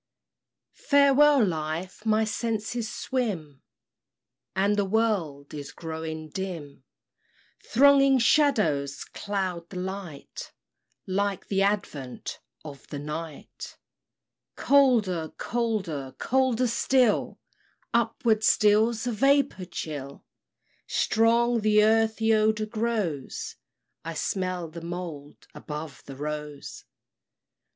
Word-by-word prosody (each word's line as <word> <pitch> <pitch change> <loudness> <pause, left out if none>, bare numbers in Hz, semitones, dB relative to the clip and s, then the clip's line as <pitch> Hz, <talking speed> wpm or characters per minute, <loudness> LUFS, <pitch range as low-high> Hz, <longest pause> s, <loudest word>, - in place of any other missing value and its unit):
] - - -63 0.2
Farewell, 280 -2 +6
Life! 165 +5 -4
My 220 0 +3
senses 220 +1 -2
swim, 210 - -3 0.9
And 200 +2 +2
the 205 - +2
world 190 -9 -1
is 145 -1 -7
growing 160 -1 -6
dim; 160 -7 -6 0.8
Thronging 275 +1 +5
shadows 210 - +2
cloud 185 -4 -4
the 185 - -8
light, 185 -5 -7 0.5
Like 195 0 -2
the 195 -1 +1
advent 175 -11 -2 0.3
of 140 -3 -10
the 145 - -6
night, 150 +1 -7 0.8
Colder, 220 - +3
colder, 195 - -2
colder 255 -1 +1
still, 245 -1 +2 0.5
Upward 220 -5 +1
steals 220 +2 +3
a 245 - 0
vapor 275 -4 +2
chill 145 -5 -7 0.6
Strong 235 +2 +2
the 210 0 +4
earthy 225 0 +3
odor 215 0 +2
grows 215 - -3 0.5
I 165 0 -5
smell 185 0 -2
the 165 +1 -9
mould 165 -4 -7
above 150 -1 -7
the 135 - -8
rose! 150 0 -6
200 Hz, 95 wpm, -26 LUFS, 160-225 Hz, 0.9 s, Farewell